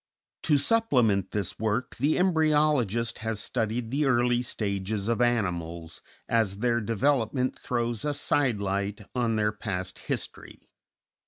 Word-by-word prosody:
To 150 Hz, -, +3 dB
supplement 125 Hz, -, +2 dB
this 100 Hz, -4 st, -3 dB
work, 110 Hz, +3 st, -1 dB
the 145 Hz, +5 st, +2 dB
embryologist 150 Hz, -, +2 dB
has 110 Hz, -1 st, -2 dB
studied 115 Hz, 0 st, -2 dB
the 145 Hz, +2 st, +1 dB
early 120 Hz, -1 st, +3 dB
stages 100 Hz, -3 st, -2 dB
of 115 Hz, +1 st, +1 dB
animals, 85 Hz, -8 st, -1 dB, 0.3 s
as 110 Hz, -4 st, +1 dB
their 120 Hz, +1 st, +1 dB
development 125 Hz, +2 st, 0 dB
throws 120 Hz, -2 st, -2 dB
a 150 Hz, -1 st, 0 dB
side 140 Hz, -5 st, +1 dB
light 100 Hz, +1 st, -2 dB
on 120 Hz, -3 st, +1 dB
their 105 Hz, -1 st, +2 dB
past 95 Hz, -4 st, -5 dB
history. -, -, -6 dB
115 Hz, 130 wpm, -27 LUFS, 105-130 Hz, 0.3 s, To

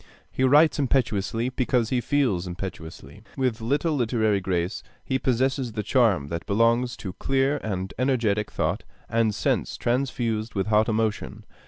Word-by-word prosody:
He 130 Hz, -, -1 dB
writes 150 Hz, +4 st, +5 dB
impetuously 120 Hz, -3 st, 0 dB
because 125 Hz, -3 st, 0 dB
he 125 Hz, -2 st, +1 dB
feels 120 Hz, -11 st, 0 dB
impetuously. 85 Hz, -2 st, -8 dB, 0.2 s
With 130 Hz, -4 st, 0 dB
little 145 Hz, +8 st, 0 dB
literary 110 Hz, -6 st, +1 dB
grace, 90 Hz, +1 st, -2 dB, 0.2 s
he 130 Hz, -1 st, 0 dB
possesses 130 Hz, -1 st, 0 dB
the 105 Hz, -, -3 dB
charm 105 Hz, -, +2 dB
that 85 Hz, 0 st, -5 dB
belongs 115 Hz, +4 st, +2 dB
to 95 Hz, -, -4 dB
clear 135 Hz, +5 st, 0 dB
and 95 Hz, -6 st, -4 dB
energetic 115 Hz, -6 st, +1 dB
thought -, -, -2 dB, 0.2 s
and 115 Hz, -2 st, +1 dB
sense -, -, -1 dB
transfused 120 Hz, -3 st, -1 dB
with 95 Hz, -1 st, 0 dB
hot 110 Hz, +1 st, +2 dB
emotion. 110 Hz, -1 st, -2 dB
115 Hz, 145 wpm, -25 LUFS, 100-130 Hz, 0.2 s, writes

